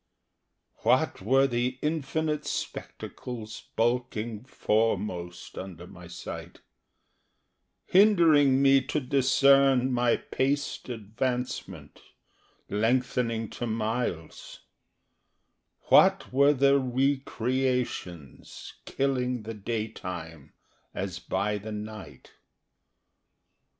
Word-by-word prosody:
What -, -, +1 dB
were 135 Hz, +7 st, +4 dB
the 125 Hz, 0 st, -1 dB
infinite 155 Hz, 0 st, -1 dB
spectacles 110 Hz, -4 st, -6 dB
bulking 120 Hz, -2 st, -1 dB
foremost 105 Hz, -8 st, -2 dB
Under 90 Hz, -2 st, -8 dB
my 90 Hz, -1 st, -12 dB
sight, 85 Hz, -, -8 dB, 1.3 s
Hindering 160 Hz, -9 st, +5 dB
me 135 Hz, 0 st, +6 dB
to 150 Hz, -, -1 dB
discern 135 Hz, -1 st, +4 dB
my 120 Hz, -1 st, +2 dB
paced 140 Hz, 0 st, -2 dB
advancement 125 Hz, +3 st, -4 dB, 0.7 s
Lengthening 115 Hz, +1 st, 0 dB
to 120 Hz, -, -4 dB
miles; 110 Hz, -7 st, -3 dB, 1.3 s
What -, -, +5 dB
were 140 Hz, +2 st, +5 dB
the 140 Hz, 0 st, +4 dB
re 130 Hz, +2 st, +1 dB
creations 125 Hz, -, -3 dB
killing 125 Hz, -3 st, -1 dB
the 115 Hz, +1 st, -6 dB
daytime 90 Hz, -, -6 dB, 0.4 s
As 95 Hz, -1 st, -4 dB
by 105 Hz, +2 st, -2 dB
the 110 Hz, +2 st, -8 dB
night? 105 Hz, -9 st, -8 dB
120 Hz, 80 wpm, -27 LUFS, 105-135 Hz, 1.3 s, me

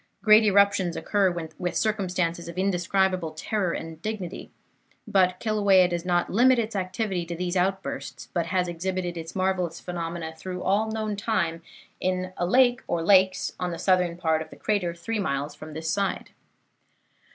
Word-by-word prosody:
Great 215 Hz, 0 st, +7 dB
eruptions 200 Hz, -3 st, +3 dB
occur 200 Hz, -2 st, +2 dB
with 175 Hz, +1 st, -4 dB
circumstances 180 Hz, -5 st, -1 dB
of 170 Hz, -, -8 dB
indescribable 185 Hz, -2 st, +1 dB
terror 200 Hz, -3 st, -1 dB
and 165 Hz, -1 st, -6 dB
dignity; 195 Hz, -3 st, -5 dB, 0.6 s
but 185 Hz, -3 st, +2 dB
Kilauea 200 Hz, -4 st, +4 dB
does 175 Hz, -1 st, -3 dB
not 175 Hz, -1 st, +1 dB
limit 250 Hz, +5 st, +5 dB
its 225 Hz, -2 st, -2 dB
activity 190 Hz, 0 st, -2 dB
to 170 Hz, 0 st, -5 dB
these 180 Hz, +1 st, -3 dB
outbursts, 190 Hz, +1 st, -2 dB
but 170 Hz, -2 st, 0 dB
has 180 Hz, 0 st, 0 dB
exhibited 175 Hz, +1 st, -3 dB
its 165 Hz, -1 st, -7 dB
marvellous 185 Hz, -3 st, 0 dB
phenomena 170 Hz, -2 st, -5 dB
through 180 Hz, +2 st, -6 dB
all 205 Hz, +4 st, +1 dB
known 215 Hz, -1 st, -2 dB
time 170 Hz, -6 st, -1 dB, 0.4 s
in 185 Hz, 0 st, -1 dB
a 175 Hz, -, 0 dB
lake 245 Hz, +3 st, +4 dB
or 170 Hz, -1 st, -1 dB
lakes 190 Hz, 0 st, +4 dB
on 180 Hz, -, -1 dB
the 170 Hz, -, -4 dB
southern 180 Hz, -2 st, +2 dB
part 160 Hz, -3 st, +1 dB
of 160 Hz, -, -7 dB
the -, -, -12 dB
crater 185 Hz, -5 st, -1 dB
three 215 Hz, +6 st, -3 dB
miles 140 Hz, -4 st, -2 dB
from 155 Hz, +1 st, -10 dB
this 160 Hz, +1 st, -3 dB
side. 200 Hz, 0 st, -2 dB
185 Hz, 165 wpm, -26 LUFS, 170-200 Hz, 0.6 s, Great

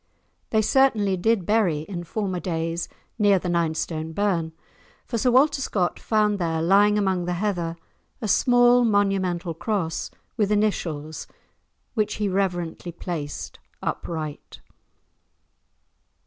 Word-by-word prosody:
They 220 Hz, -1 st, +2 dB
certainly 215 Hz, -6 st, +3 dB
did 195 Hz, +1 st, +1 dB
bury, 195 Hz, -8 st, +2 dB
in 175 Hz, +1 st, -6 dB
former 190 Hz, -2 st, -2 dB
days, 165 Hz, -1 st, -2 dB, 0.3 s
near 205 Hz, -2 st, +5 dB
the 180 Hz, 0 st, -3 dB
Ninestone 160 Hz, -1 st, -1 dB
Burn, 175 Hz, -4 st, 0 dB, 0.5 s
for 230 Hz, -, -2 dB
Sir 250 Hz, -, +2 dB
Walter 275 Hz, +3 st, +4 dB
Scott 185 Hz, -8 st, -1 dB
found 210 Hz, -2 st, +1 dB
there, 165 Hz, -2 st, 0 dB
lying 200 Hz, +5 st, +4 dB
among 190 Hz, -3 st, +1 dB
the 180 Hz, -, -1 dB
heather, 175 Hz, -4 st, -1 dB, 0.4 s
a 220 Hz, -, -3 dB
small 245 Hz, +3 st, +5 dB
monumental 195 Hz, -5 st, +1 dB
cross, 170 Hz, -1 st, -2 dB, 0.3 s
with 210 Hz, -2 st, +1 dB
initials, 165 Hz, -8 st, -1 dB, 0.7 s
which 215 Hz, -2 st, 0 dB
he 210 Hz, -, -1 dB
reverently 180 Hz, -3 st, -2 dB
placed 165 Hz, -4 st, -6 dB, 0.2 s
upright. 155 Hz, -3 st, -5 dB
190 Hz, 120 wpm, -24 LUFS, 170-210 Hz, 0.7 s, near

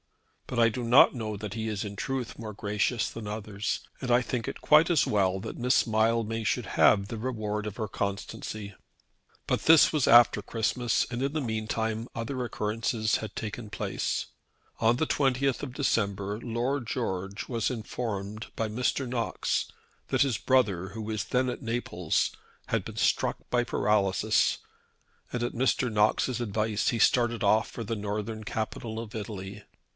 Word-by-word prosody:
"But 125 Hz, -, -4 dB
I 115 Hz, -, +6 dB
do 120 Hz, +2 st, -2 dB
not 120 Hz, +3 st, +7 dB
know 110 Hz, -4 st, -4 dB
that 105 Hz, 0 st, -6 dB
he 110 Hz, 0 st, -3 dB
is 105 Hz, 0 st, -3 dB
in 100 Hz, 0 st, -6 dB
truth 130 Hz, +3 st, -3 dB
more 110 Hz, -2 st, -6 dB
gracious 105 Hz, +3 st, 0 dB
than 115 Hz, -2 st, -7 dB
others, 105 Hz, 0 st, -3 dB, 0.2 s
and 125 Hz, -2 st, -2 dB
I 120 Hz, +1 st, +5 dB
think 120 Hz, -2 st, -3 dB
it -, -, -5 dB
quite 155 Hz, +3 st, +5 dB
as 170 Hz, -5 st, +3 dB
well 95 Hz, -2 st, +2 dB
that 110 Hz, -, -6 dB
Miss 125 Hz, +1 st, +3 dB
Mildmay 115 Hz, 0 st, +1 dB
should 105 Hz, -, 0 dB
have 100 Hz, 0 st, +5 dB
the 115 Hz, -, -5 dB
reward 110 Hz, -3 st, -3 dB
of 105 Hz, -, -6 dB
her 110 Hz, -, -2 dB
constancy." 100 Hz, +1 st, -4 dB, 0.7 s
But -, -, +1 dB
this 160 Hz, 0 st, +6 dB
was 150 Hz, -4 st, +2 dB
after 120 Hz, -3 st, +7 dB
Christmas, 115 Hz, +2 st, 0 dB
and 120 Hz, 0 st, -3 dB
in 135 Hz, +1 st, 0 dB
the 155 Hz, -, -1 dB
meantime 110 Hz, -1 st, -2 dB
other 125 Hz, +3 st, -3 dB
occurrences 110 Hz, 0 st, 0 dB
had 110 Hz, -2 st, -6 dB
taken 110 Hz, 0 st, -5 dB
place. -, -, -2 dB, 0.5 s
On 115 Hz, +2 st, +3 dB
the 160 Hz, -, 0 dB
20th 135 Hz, -1 st, +1 dB
of 130 Hz, -3 st, -5 dB
December 100 Hz, -7 st, 0 dB
Lord 120 Hz, +3 st, -1 dB
George 95 Hz, +1 st, -3 dB
was 115 Hz, -4 st, 0 dB
informed 110 Hz, -3 st, -4 dB
by 110 Hz, -, -1 dB
Mr. 125 Hz, +4 st, -1 dB
Knox 120 Hz, -2 st, -1 dB, 0.4 s
that -, -, +3 dB
his 130 Hz, -6 st, 0 dB
brother, 100 Hz, -9 st, +2 dB
who 110 Hz, +4 st, -7 dB
was 110 Hz, -1 st, -3 dB
then 130 Hz, +1 st, +1 dB
at 125 Hz, -, -3 dB
Naples, 115 Hz, -, -1 dB, 0.3 s
had -, -, -1 dB
been -, -, -9 dB
struck -, -, +2 dB
by 120 Hz, -1 st, +3 dB
paralysis, 105 Hz, -1 st, +2 dB, 0.7 s
and 120 Hz, -1 st, -2 dB
at 120 Hz, -, -2 dB
Mr. 125 Hz, -1 st, +1 dB
Knox's 110 Hz, +4 st, +2 dB
advice 110 Hz, -1 st, 0 dB
he 115 Hz, -, -1 dB
started 120 Hz, 0 st, +3 dB
off 105 Hz, +2 st, +3 dB
for 115 Hz, -, -6 dB
the 115 Hz, -, -2 dB
southern 105 Hz, +1 st, -4 dB
capital 110 Hz, +1 st, -4 dB
of 115 Hz, -1 st, -7 dB
Italy. 105 Hz, -2 st, -6 dB
110 Hz, 170 wpm, -28 LUFS, 105-120 Hz, 0.7 s, not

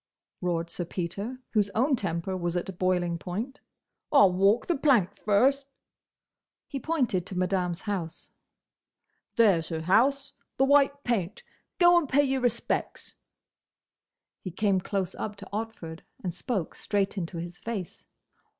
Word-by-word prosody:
roared 170 Hz, -2 st, -1 dB
Sir 175 Hz, -, -3 dB
Peter, 195 Hz, +8 st, -4 dB
whose 210 Hz, -3 st, +2 dB
own 265 Hz, +5 st, +3 dB
temper 185 Hz, -3 st, -2 dB
was 175 Hz, -1 st, -1 dB
at 180 Hz, 0 st, -5 dB
boiling 180 Hz, -2 st, +1 dB
point. 220 Hz, +11 st, -5 dB, 0.5 s
"I'll 205 Hz, -10 st, +7 dB
walk 195 Hz, +5 st, +3 dB
the 345 Hz, -, +1 dB
plank 235 Hz, -, +3 dB
first!" 265 Hz, +8 st, +2 dB, 1.0 s
He 275 Hz, -, -4 dB
pointed 255 Hz, -, 0 dB
to 185 Hz, -, -5 dB
Madame's 180 Hz, -1 st, 0 dB
house. 190 Hz, -7 st, -4 dB, 1.0 s
"There's 195 Hz, -8 st, +4 dB
her 160 Hz, -2 st, -3 dB
house: 265 Hz, -, +2 dB, 0.2 s
the 270 Hz, -, +4 dB
white 280 Hz, 0 st, +4 dB
paint. 215 Hz, -5 st, -1 dB, 0.3 s
Go 350 Hz, -1 st, +7 dB
and 300 Hz, -6 st, -5 dB
pay 285 Hz, +2 st, +4 dB
your 265 Hz, -1 st, 0 dB
respects." 240 Hz, -2 st, -2 dB, 1.3 s
He 185 Hz, -, -6 dB
came 190 Hz, +1 st, +1 dB
close 190 Hz, -1 st, -2 dB
up 210 Hz, -1 st, -5 dB
to 200 Hz, -1 st, -11 dB
Otford, 210 Hz, -7 st, -5 dB, 0.2 s
and 180 Hz, -2 st, -2 dB
spoke 185 Hz, -1 st, -3 dB
straight 200 Hz, -2 st, -1 dB
into 170 Hz, -3 st, -4 dB
his 175 Hz, +1 st, -6 dB
face. 200 Hz, -3 st, -5 dB
200 Hz, 140 wpm, -28 LUFS, 180-250 Hz, 1.3 s, I'll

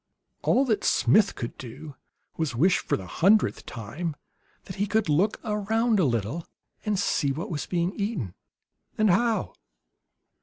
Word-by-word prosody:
All 270 Hz, -, +3 dB
that 220 Hz, -5 st, 0 dB
Smith 205 Hz, -1 st, +4 dB
could 120 Hz, -, -5 dB
do 135 Hz, +4 st, -9 dB, 0.4 s
was 160 Hz, -2 st, -1 dB
to -, -, -6 dB
wish, 180 Hz, +7 st, +4 dB
for -, -, -1 dB
the 95 Hz, -, -8 dB
hundredth 195 Hz, -, +2 dB
time, 145 Hz, +9 st, -5 dB, 0.5 s
that 185 Hz, -, -9 dB
he 205 Hz, +2 st, 0 dB
could 215 Hz, 0 st, +1 dB
look 180 Hz, +9 st, +2 dB
around 220 Hz, +1 st, +1 dB
a 180 Hz, -, +4 dB
little 120 Hz, +6 st, -1 dB, 0.4 s
and 210 Hz, -2 st, 0 dB
see 145 Hz, -7 st, +1 dB
what 160 Hz, +6 st, -4 dB
was 150 Hz, -, -3 dB
being 175 Hz, +1 st, 0 dB
eaten, 200 Hz, -, -3 dB, 0.6 s
and 215 Hz, -3 st, +4 dB
how. 230 Hz, +4 st, +1 dB
180 Hz, 155 wpm, -26 LUFS, 145-210 Hz, 0.6 s, Smith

